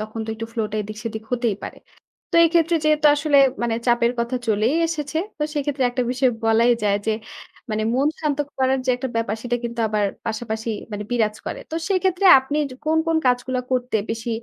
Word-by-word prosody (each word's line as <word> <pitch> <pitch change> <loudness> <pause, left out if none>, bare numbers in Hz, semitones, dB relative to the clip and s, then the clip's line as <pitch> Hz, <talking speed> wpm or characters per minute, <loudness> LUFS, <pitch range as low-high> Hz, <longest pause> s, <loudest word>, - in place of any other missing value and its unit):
তখন 215 +1 -5
তো - - -12
একটু 225 +1 -6
ফ্লোটা 215 -2 -2
এদিক 215 +1 -8
সেদিক 220 -1 -4
হতেই 235 -4 0
পারে। - - -7 0.6
তো - - 0
এই 335 - +5
ক্ষেত্রে 335 0 +3
যেহেতু 305 -1 +4
আসলে 290 -1 +2 0.3
মানে 235 -1 0
চাপের 240 0 +3
কথা 235 +2 -1
চলেই 220 +6 +2
এসেছে। 310 -2 -3 0.2
তো 300 - -1
সেক্ষেত্রে 290 -2 -1
একটা 250 +1 -1
বিষয় 255 +1 +2
বলাই 225 +2 +4
যায় 200 -1 +2
যে - - +3 0.6
মানে 215 0 -1
মন 275 +3 +2
শান্ত 300 -3 -1 0.2
করার 265 0 +2
যে - - 0
একটা 260 +1 -4
ব্যাপার 230 -2 0
সেটা 245 0 0
কিন্তু 235 0 -4
আবার 210 -1 0 0.2
পাশাপাশি 220 0 -3 0.2
মানে 210 0 -4
বিরাজ 220 -3 +1
করে। - - -4
তো - - -2
সেক্ষেত্রে 375 0 +1
আপনি 265 +3 -3 0.3
কোন, 315 +1 +2
কোন 325 0 +2
কাজগুলা 250 +1 0
করতে 250 -3 0
বেশি 225 +1 -3
245 Hz, 195 wpm, -22 LUFS, 220-285 Hz, 0.6 s, এই